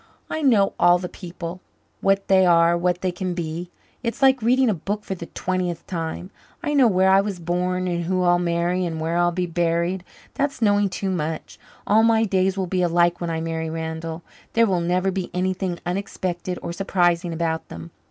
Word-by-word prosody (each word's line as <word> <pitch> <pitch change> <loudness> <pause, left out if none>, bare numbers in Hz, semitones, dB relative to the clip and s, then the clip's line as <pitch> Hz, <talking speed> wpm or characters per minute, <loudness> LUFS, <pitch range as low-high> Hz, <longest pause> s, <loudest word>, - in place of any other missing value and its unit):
"I 315 - -2
know 220 -9 +4
all 175 0 +6
the 180 0 -5
people 175 0 -8 0.4
what 195 0 +1
they 190 -1 +5
are 170 -1 +5
what 175 +1 0
they 185 - 0
can 180 0 -3
be. 170 +1 -4 0.3
It's 235 +3 -3
like 265 -2 +5
reading 255 +3 +3
a 220 - +3
book 205 +5 -4
for 195 - -4
the 170 -2 -7
twentieth 180 -2 -3
time. 170 +2 -5 0.3
I 295 - -1
know 270 -4 +5
where 190 -2 +3
I 195 +1 +6
was 200 -2 -4
born 180 +2 -1
and 170 -1 -1
who 185 +1 0
I'll 175 0 +4
marry 175 +1 0
and 165 -2 -3
where 165 +1 -1
I'll 175 0 +3
be 180 +1 -1
buried. 170 +1 0 0.3
That's 280 -1 -1
knowing 205 -2 +3
too 190 +1 -3
much. 160 -3 -4 0.3
All 215 +2 +4
my 225 0 +4
days 190 -2 +1
will 190 - 0
be 185 +1 -1
alike 175 0 +2
when 170 - -2
I 160 -1 -2
marry 160 0 -3
Randall. 160 +1 -5 0.3
There 230 0 +5
will 185 -5 +1
never 180 +3 +1
be 185 -1 -3
anything 185 -1 -1
unexpected 180 -1 -3
or 170 - -4
surprising 175 -2 +1
about 160 -1 -2
them. 85 0 -9
180 Hz, 200 wpm, -23 LUFS, 170-195 Hz, 0.4 s, all